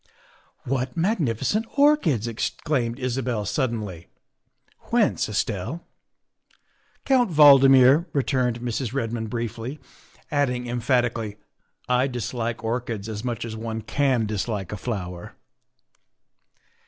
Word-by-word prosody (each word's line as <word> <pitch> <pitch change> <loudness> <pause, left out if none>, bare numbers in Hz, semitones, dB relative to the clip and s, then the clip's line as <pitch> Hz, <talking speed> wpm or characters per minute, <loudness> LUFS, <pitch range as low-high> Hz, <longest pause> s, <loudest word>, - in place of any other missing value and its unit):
" - - -33 0.2
What 130 +1 -2
magnificent 165 - 0
orchids," 280 - +3
exclaimed 115 +1 -2
Isabel 125 -4 -2
sud 125 +5 0
denly. 100 -7 -6 0.2
' - - -51
' - - -36
Whence, - - +2
Estelle? 110 - -3 0.3
' - - -40
' - - -42
" - - -39
Count 255 -5 +3
Valdmir, 140 0 +7
" - - -36
returned 125 -4 0
Mrs. 120 +1 -3
Redmond 115 -3 -2
briefly, 120 +4 -4 0.5
adding 125 -4 0
emphatically, 120 -3 0 0.3
" - - -49
I 125 +1 +2
dislike 120 -2 -4
orchids 115 -2 -3
as 110 -1 -5
much 120 -3 -3
as 110 -1 -6
one 110 0 -4
can 130 -1 +1
dislike 105 -2 -3
a 105 - -4
flower." 90 -6 -5
120 Hz, 130 wpm, -24 LUFS, 110-135 Hz, 0.5 s, Valdmir